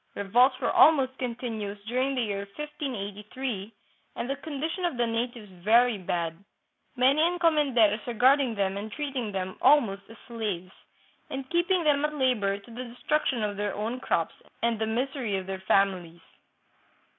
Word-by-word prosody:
Revolts 245 +6 +3
were - - 0
almost 270 -4 +5
continuous 230 -5 -4
during 255 +5 0
the 250 - +1
year 200 -2 -3
1583, 230 -6 -5 0.4
and 240 - -3
the 275 - -1
condition 315 +5 -4
of 345 -8 -1
the 240 - +2
natives 230 -2 -3
very 230 +1 +4
bad, 170 -1 -3 0.5
many 265 +4 +4
encomenderos 295 - +3
regarding 250 +1 +3
them 195 -1 0
and 210 +2 -6
treating 270 -7 -3
them 190 -1 -4
almost 235 -9 +4
as 225 - -12
slaves, 205 -6 -4 0.6
and 270 -1 -5
keeping 345 +1 +2
them 290 -2 +3
at 300 0 -1
labor 235 -8 +1
to 200 +4 -15
the 245 +2 -6
destruction 245 0 -1
of 205 -1 -2
their 205 -1 -2
own 225 +5 -3
crops 165 -9 0 0.3
and 230 -2 +1
the 220 - 0
misery 245 -1 -1
of 190 - -5
their 190 0 -5
families. 180 -4 +1
235 Hz, 155 wpm, -27 LUFS, 205-270 Hz, 0.6 s, almost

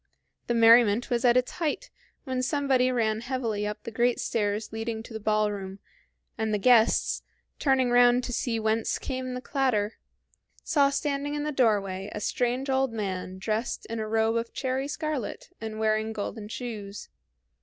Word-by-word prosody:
The 240 - +1
merriment 230 0 +5
was 235 -1 +1
at 245 0 +5
its 250 - +1
height 320 -4 -3 0.3
when 260 -2 -2
somebody 265 -2 +2
ran 220 -3 0
heavily 230 -5 -2
up 210 - -6
the 230 - -6
great 240 +2 +1
stairs 210 0 -1
leading 225 0 -3
to 230 - -11
the 220 - -4
ballroom, 210 -2 -1 0.6
and 220 -1 0
the 210 - +2
guests, 230 +2 +4 0.4
turning 265 -3 +2
round 245 0 +5
to 245 - -4
see 230 -1 -1
whence 220 0 0
came 255 -1 -4
the 250 - -5
clatter, 245 -7 0 0.6
saw 280 -2 +3
standing 280 +1 -2
in 295 - -2
the 300 - -1
doorway 200 -7 +1
a - - -4
strange 250 +4 -1
old 265 -1 +1
man 190 -4 -4
dressed 215 +4 -2
in 230 - -3
a 215 - -3
robe 225 +1 +2
of 230 0 -3
cherry 265 +1 -2
scarlet 295 -7 -4
and 220 -1 -5
wearing 220 0 +1
golden 210 0 -5
shoes. 210 -3 -6
230 Hz, 165 wpm, -27 LUFS, 215-255 Hz, 0.6 s, merriment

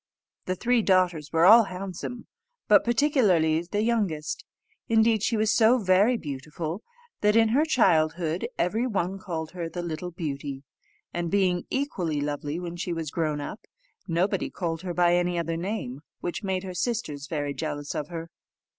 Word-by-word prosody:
The 185 - -1
three 240 +4 +2
daughters 180 -7 +2
were 165 +1 +4
all 225 +3 +9
handsome, 195 +5 -6 0.4
but - - +6
particularly 215 - +3
the 205 +5 -2
youngest; 185 -10 -1 0.5
indeed, 225 -1 +4
she 225 +1 +1
was 215 0 +2
so 230 +3 +5
very 205 +3 +3
beautiful, 155 +4 -5 0.4
that 210 +1 +3
in 225 -1 +5
her 270 +7 +3
childhood 170 - +2
every 220 +8 +1
one 195 -3 -2
called 165 -5 -5
her 170 -2 -5
the 175 +1 -5
Little 170 +1 -4
Beauty; 140 -5 -5 0.5
and 170 -1 -2
being 185 -2 +1
equally 180 - -1
lovely 145 +2 -3
when 175 -1 -6
she 175 0 -3
was 160 -3 -4
grown 155 -3 -1
up, 195 - -6 0.5
nobody 175 +3 0
called 165 -3 -3
her 180 -2 -4
by 175 -1 +4
any 175 0 +1
other 165 -1 -1
name, 170 - -4 0.2
which 175 - -4
made 190 -2 -2
her 185 -1 -6
sisters 175 - -2
very 145 -3 -2
jealous 145 -1 -4
of 150 - -3
her. 165 0 -7
175 Hz, 165 wpm, -26 LUFS, 160-210 Hz, 0.5 s, all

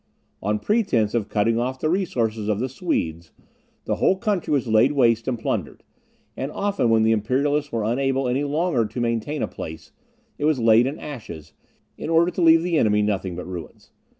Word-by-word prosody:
On 105 +2 0
pretence 120 - +1
of 110 -3 -1
cutting 110 +2 +1
off 130 +2 -2
the 155 - -1
resources 115 - -1
of 105 -2 +1
the 130 +3 -2
Swedes, 85 - -3 0.5
the - - -1
whole 190 - +3
country 200 -4 -2
was 140 -4 +1
laid 110 +6 +4
waste 115 -5 +2
and 125 -2 -1
plundered; 110 - -3 0.5
and 135 +3 -4
often 200 - 0
when 110 -1 +4
the 110 - +3
Imperialists 140 +7 0
were 115 -2 -1
unable 135 +3 0
any 130 +3 0
longer 145 -5 0
to 125 - -7
maintain 120 +5 -1
a - - 0
place, 80 0 -9 0.5
it 145 - -1
was 155 -2 +3
laid 115 +1 +4
in 140 - -4
ashes, 85 - -9 0.5
in - - -5
order 165 +2 +3
to 180 - -3
leave 165 0 +6
the 170 -3 +1
enemy 105 -1 +3
nothing 95 -3 -2
but 90 - -6
ruins. 90 -3 -9
120 Hz, 190 wpm, -23 LUFS, 110-150 Hz, 0.5 s, leave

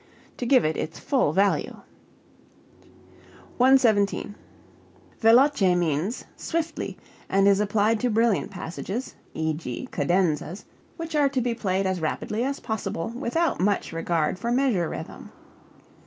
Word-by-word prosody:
_, - - -33
to 245 - -3
give 255 - +5
it 155 0 0
its 160 - -4
full 265 - +1
value. 195 +4 +1 1.8
117. 235 -6 +3 0.9
Veloce 225 -5 +5
means 175 - -1
swiftly, 330 0 -3 0.3
and 195 +1 +3
is 200 0 +5
applied 210 +2 +2
to 250 - 0
brilliant 225 -2 +2
passages 195 +6 -5 0.2
(e.g., 160 -5 -3
cadenzas) 175 0 0 0.3
which 330 -1 -6
are 290 -2 +4
to 270 -1 -1
be 245 -1 0
played 195 -4 -1
as 185 -2 -1
rapidly 210 +8 -2
as 275 +2 -2
possible 220 -5 -3
without 280 +8 -1
much 200 -3 0
regard 165 +1 -1
for 235 +4 -2
measure 240 - +1
rhythm. - - -8
205 Hz, 125 wpm, -25 LUFS, 175-250 Hz, 1.8 s, give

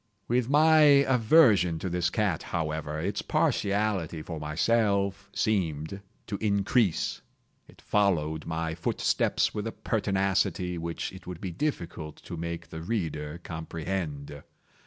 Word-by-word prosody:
With 125 0 +1
my 155 +2 +6 0.3
aversion 115 - +5
to 95 - -4
this 90 -1 0
cat, 100 -4 0
however, 80 -2 -3
its - - -2
partiality 100 -6 0
for 80 -1 -6
myself 100 +5 +1
seemed 90 -3 -1 0.2
to 100 - -4
increase. 100 -1 +1 0.5
It - - -19
followed 80 -7 +1
my 80 0 -2
footsteps 80 - 0
with 105 0 -3
a - - -3
pertinacity 95 -4 0
which 85 +2 -4
it 95 -2 -12
would 90 -2 -6
be 95 -2 -4
difficult 85 - -3
to - - -7
make 85 0 -5
the 80 - -7
reader 80 -6 -3
comprehend. 80 -3 -5
90 Hz, 125 wpm, -28 LUFS, 80-105 Hz, 0.5 s, my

